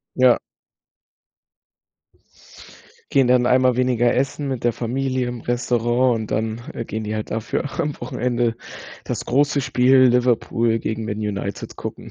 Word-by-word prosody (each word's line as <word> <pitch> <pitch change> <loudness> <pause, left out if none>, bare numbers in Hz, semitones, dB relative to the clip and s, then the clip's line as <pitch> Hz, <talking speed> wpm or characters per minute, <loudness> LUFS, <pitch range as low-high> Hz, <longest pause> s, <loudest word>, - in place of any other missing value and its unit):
Ja. 130 -2 +5 2.7
Gehen 135 -2 +4
dann 125 0 +4
einmal 125 0 +3
weniger 125 -2 +2
essen 135 +2 -1
mit 130 -3 -4
der 120 - +3
Familie 130 +2 -2
im 120 -2 -6
Restaurant 120 -1 +1
und 110 - -8
dann, 110 +1 -2
äh, 115 - -5
gehen 110 0 -4
die 105 +1 -3
halt 110 0 -4
dafür 115 +5 -3
am 145 -1 -2
Wochenende 120 -1 -1 0.5
das - - -4
große 145 +2 +2
Spiel 130 0 +3
Liverpool 120 -2 +2
gegen 110 0 -3
Man 105 -1 -3
United 100 -1 -4
gucken. - - -7
120 Hz, 140 wpm, -21 LUFS, 115-130 Hz, 2.7 s, Ja